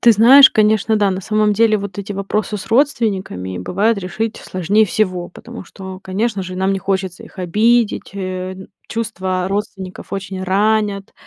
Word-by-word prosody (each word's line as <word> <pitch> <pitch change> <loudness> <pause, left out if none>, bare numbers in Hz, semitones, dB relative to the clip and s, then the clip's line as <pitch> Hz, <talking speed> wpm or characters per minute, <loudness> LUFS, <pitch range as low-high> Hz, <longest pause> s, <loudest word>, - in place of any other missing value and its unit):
Ты 235 -1 +7
знаешь, 260 +6 +8
конечно, 215 0 +2
да. 205 -2 +2
На 185 0 -3
самом 215 +1 +1
деле 215 +1 +3
вот 200 -1 -7
эти 200 +1 -5
вопросы 205 +2 -2
с 195 - -8
родственниками 200 - 0
бывает 200 - 0
решить 200 +4 -3
сложнее 195 +4 +1
всего, 185 -3 -1
потому 235 +4 -11
что, 190 +1 -9
конечно 200 +2 -2
же, 185 0 -7
нам 190 +1 +1
не 195 - -1
хочется 190 -1 -3
их - - -17
обидеть. 215 +4 +1
Э, 185 -1 -4 0.3
чувства 185 -5 -2
родственников 195 -2 -5
очень 195 -1 -5
ранят, 205 +1 0
200 Hz, 160 wpm, -18 LUFS, 185-215 Hz, 0.3 s, знаешь